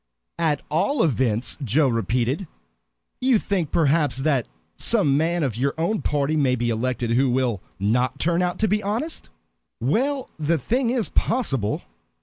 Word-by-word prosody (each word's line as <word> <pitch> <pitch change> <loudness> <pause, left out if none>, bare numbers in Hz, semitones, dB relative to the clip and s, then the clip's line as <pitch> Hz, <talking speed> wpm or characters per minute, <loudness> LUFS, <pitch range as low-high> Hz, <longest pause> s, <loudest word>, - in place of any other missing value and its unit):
"At 155 -4 +1
all 225 - +2
events!" 125 -6 0
Joe 135 +5 +3
repeated. 120 - 0 0.7
"You 255 -2 +3
think, 190 -7 -1
perhaps, 150 -5 +2
that 135 -3 +1 0.3
some 190 -12 +3
man 165 +3 +1
of 130 -7 -1
your 140 +3 0
own 190 +6 0
party 145 +1 0
may 135 -4 +2
be 120 -1 -1
elected 120 +1 -1
who 130 +3 +3
will 120 -6 0 0.2
not 120 +5 +1
turn 170 +2 +1
out 180 0 -1
to - - +2
be 210 +1 +1
honest?" 230 +11 -3 0.5
"Well, 255 - 0
the 160 +2 +1
thing 235 - 0
is 240 -3 0
possible. 135 - 0
145 Hz, 150 wpm, -23 LUFS, 125-185 Hz, 0.7 s, Joe